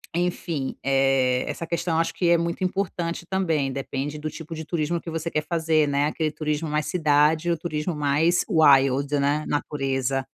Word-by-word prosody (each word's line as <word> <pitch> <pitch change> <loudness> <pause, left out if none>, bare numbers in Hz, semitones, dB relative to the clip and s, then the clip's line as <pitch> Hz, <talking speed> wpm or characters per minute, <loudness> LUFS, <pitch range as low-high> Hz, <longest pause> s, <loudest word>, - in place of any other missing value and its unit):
enfim, 170 -5 -2
eh, 135 -2 +2
essa 165 - -4
questão 170 0 -1
acho 165 - 0
que 175 -2 0
é 170 - +5
muito 170 +2 -2
importante 180 -3 -2
também. 165 -8 0
Depende 140 +2 -4
do 155 +1 -4
tipo 160 +1 -8
de 160 0 -5
turismo 170 +1 -1
que 170 - -7
você 165 +1 -3
quer 155 - -1
fazer, 160 -3 +2
né? 140 0 +1
Aquele 155 0 -1
turismo 150 +1 -2
mais 150 0 0
cidade 155 0 +2
ou 170 - +1
turismo 155 0 -3
mais 150 +4 +2
wild, 140 -4 +4
né, 145 +2 +1
natureza. 135 -2 -1
155 Hz, 175 wpm, -24 LUFS, 140-170 Hz, -, é